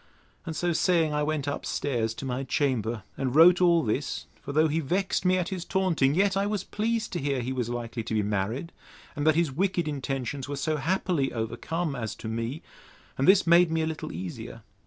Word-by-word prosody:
And 160 Hz, -, -3 dB
so 175 Hz, +2 st, 0 dB
saying, 165 Hz, -2 st, +2 dB
I 150 Hz, -, 0 dB
went 150 Hz, -1 st, -1 dB
up 145 Hz, -, -3 dB
stairs 115 Hz, -5 st, -1 dB
to 135 Hz, -, -6 dB
my 130 Hz, 0 st, -2 dB
chamber, 120 Hz, -6 st, -1 dB
and 135 Hz, -1 st, -2 dB
wrote 170 Hz, +3 st, +7 dB
all 170 Hz, -2 st, +5 dB
this; 120 Hz, +5 st, -2 dB, 0.2 s
for -, -, -6 dB
though 155 Hz, +2 st, +4 dB
he 155 Hz, +2 st, 0 dB
vexed 185 Hz, +7 st, -1 dB
me 185 Hz, 0 st, +4 dB
at 180 Hz, -1 st, -1 dB
his 185 Hz, -3 st, -4 dB
taunting, 170 Hz, -8 st, +1 dB
yet 195 Hz, +1 st, +3 dB
I 200 Hz, +1 st, +1 dB
was 210 Hz, -1 st, -2 dB
pleased 225 Hz, +1 st, -2 dB
to 175 Hz, -, -1 dB
hear 140 Hz, -1 st, -1 dB
he 130 Hz, +2 st, -3 dB
was 125 Hz, -3 st, -2 dB
likely 120 Hz, -1 st, -4 dB
to 115 Hz, -, -2 dB
be 105 Hz, -, +2 dB
married, 105 Hz, -, -2 dB, 0.4 s
and 145 Hz, +1 st, -1 dB
that 155 Hz, -, +5 dB
his 165 Hz, -3 st, +2 dB
wicked 175 Hz, +2 st, 0 dB
intentions 135 Hz, -1 st, -3 dB
were 145 Hz, -, -2 dB
so 155 Hz, +2 st, -1 dB
happily 165 Hz, -2 st, 0 dB
overcome 125 Hz, +8 st, -3 dB
as 110 Hz, -3 st, -4 dB
to 110 Hz, -, -8 dB
me; 115 Hz, +6 st, -3 dB, 0.5 s
and 135 Hz, -, 0 dB
this 195 Hz, 0 st, +6 dB
made 170 Hz, +1 st, +6 dB
me 160 Hz, 0 st, +1 dB
a -, -, +1 dB
little 160 Hz, -1 st, -4 dB
easier. 90 Hz, +2 st, -7 dB
150 Hz, 215 wpm, -27 LUFS, 125-175 Hz, 0.5 s, wrote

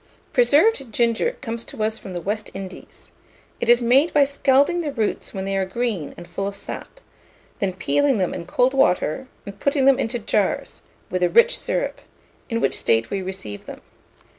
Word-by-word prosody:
PRESERVED 275 Hz, -, +3 dB
GINGER 235 Hz, -, +1 dB
comes 230 Hz, -3 st, 0 dB
to 215 Hz, -, -5 dB
us 220 Hz, +1 st, -1 dB
from 190 Hz, -, -9 dB
the 175 Hz, -, -4 dB
West 210 Hz, +4 st, -3 dB
Indies. 190 Hz, -1 st, -10 dB, 0.5 s
It -, -, -2 dB
is 240 Hz, 0 st, +6 dB
made 270 Hz, +8 st, +4 dB
by 290 Hz, -, +7 dB
scalding 280 Hz, +4 st, +2 dB
the 300 Hz, -3 st, -3 dB
roots 220 Hz, -6 st, -2 dB
when 190 Hz, -1 st, -4 dB
they 195 Hz, 0 st, -2 dB
are 195 Hz, -, +1 dB
green 195 Hz, -4 st, -3 dB
and 175 Hz, -, -10 dB
full 195 Hz, +3 st, -3 dB
of 200 Hz, -, -5 dB
sap, -, -, -8 dB, 0.6 s
then 195 Hz, -2 st, 0 dB
peeling 275 Hz, +7 st, +1 dB
them 185 Hz, -3 st, 0 dB
in 170 Hz, -, -6 dB
cold 250 Hz, +7 st, +2 dB
water, 260 Hz, -, +1 dB, 0.2 s
and 200 Hz, 0 st, -9 dB
putting 280 Hz, -1 st, +1 dB
them 275 Hz, -1 st, +5 dB
into 240 Hz, -1 st, -1 dB
jars, 210 Hz, -3 st, -1 dB, 0.3 s
with 185 Hz, -, -1 dB
a 180 Hz, -, +3 dB
rich 475 Hz, +1 st, +5 dB
syrup; -, -, -2 dB, 0.5 s
in 230 Hz, -1 st, -1 dB
which -, -, +1 dB
state 115 Hz, 0 st, +1 dB
we 195 Hz, -, -1 dB
receive 185 Hz, -, -6 dB
them. -, -, -9 dB
225 Hz, 190 wpm, -22 LUFS, 190-270 Hz, 0.6 s, by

